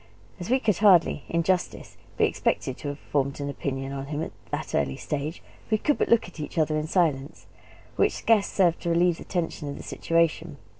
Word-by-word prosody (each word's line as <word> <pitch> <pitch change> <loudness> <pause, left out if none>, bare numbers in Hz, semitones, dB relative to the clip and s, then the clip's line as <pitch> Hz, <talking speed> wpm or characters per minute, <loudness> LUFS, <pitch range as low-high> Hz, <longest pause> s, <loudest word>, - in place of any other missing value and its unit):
As 175 - -6
we 260 +2 +3
could 210 -7 +1
hardly, 180 -8 +4
in 170 0 +1
justice, 185 +1 -1 0.2
be - - +4
expected 130 - -1
to 150 - -7
have 145 0 -4
formed 140 -1 -2
an 140 0 -3
opinion 135 -1 -4
on 135 0 -5
him 150 +2 -3
at - - -6 0.2
that - - -4
early 65 -2 0
stage, 150 +2 -4 0.3
we 215 - +3
could 295 +6 0
but - - +1
look 235 -5 +4
at 180 - -13
each 150 - -6
other 155 -1 +2
in 155 0 -1
silence; 155 -4 0 0.5
which - - +3
scarce 220 -3 +3
served 175 -4 +2
to 170 - -2
relieve 170 0 +2
the - - -8
tension 165 -5 -3
of 140 - -6
the - - -9
situation. 165 -2 0
160 Hz, 210 wpm, -26 LUFS, 145-180 Hz, 0.5 s, hardly